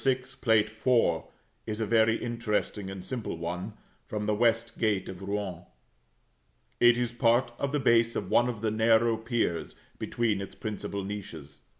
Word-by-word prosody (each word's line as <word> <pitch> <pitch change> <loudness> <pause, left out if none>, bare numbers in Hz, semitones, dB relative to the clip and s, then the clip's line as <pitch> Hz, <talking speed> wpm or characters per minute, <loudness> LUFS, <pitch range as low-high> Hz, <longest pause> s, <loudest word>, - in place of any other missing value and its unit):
6, 130 0 0
Plate 110 -5 +3
IV. 110 -6 +1 0.4
is 110 0 -3
a 110 - 0
very 115 0 +4
interesting 110 -4 -2
and 95 -1 -7
simple 120 -9 -4
one, 90 +5 -4 0.3
from 105 -1 -3
the 105 - +1
west 115 +1 +1
gate 105 -4 +1
of 95 0 -8
Rouen. 95 -3 -3 1.2
It 120 0 +6
is 120 -1 0
part 120 +1 +2
of 140 - -1
the 150 - +1
base 115 -2 +3
of - - -3
one 120 +1 +4
of 115 -4 -5
the 110 -1 0
narrow 115 +1 +4
piers 115 -7 -2 0.2
between 110 -4 0
its 100 - -8
principal 100 -2 -4
niches. 80 -8 -7
110 Hz, 165 wpm, -29 LUFS, 100-120 Hz, 1.2 s, It